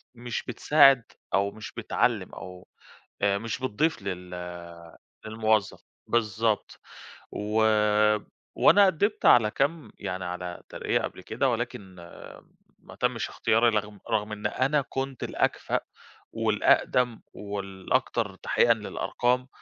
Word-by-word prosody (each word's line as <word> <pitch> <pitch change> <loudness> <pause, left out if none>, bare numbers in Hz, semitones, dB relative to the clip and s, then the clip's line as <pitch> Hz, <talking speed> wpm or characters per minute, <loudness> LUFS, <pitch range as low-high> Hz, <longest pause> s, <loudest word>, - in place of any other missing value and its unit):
مش 120 -1 -4
بتساعد 140 -4 +5 0.3
أو 100 +1 +2
مش 110 +1 -9
بتعلّم - - 0
أو 90 -1 -10 0.6
آآ 100 0 +3
مش 115 +1 -4
بتضيف 130 +3 -1
لل 90 -2 -5 1.0
للموظَّف. 110 -2 0 0.3
بالضبط. 110 -1 0 0.5
و 105 +2 0 0.9
وأنا 200 0 +6
قدِّمت 200 +4 0
على 110 -3 +6
كام 145 +6 -1
يعني 95 0 -4
على 90 0 -6
ترقية - - -1
قبْل - - -6
كده - - -1
ولكن 95 -2 -4 0.9
ما - - -14
تمِّش - - -1
اختياري، 115 +2 +2
رغم 105 -2 -2
رغم 105 -1 0
إن 105 0 -2
أنا 135 +6 +1
كنت 135 -1 -4
الأكفأ - - 0 0.5
والأقدَم 125 -2 +2
والأكتر 100 -2 -2
تحقيقًا - - +3
للأرقام 125 +1 -1
110 Hz, 110 wpm, -27 LUFS, 100-125 Hz, 1.0 s, وأنا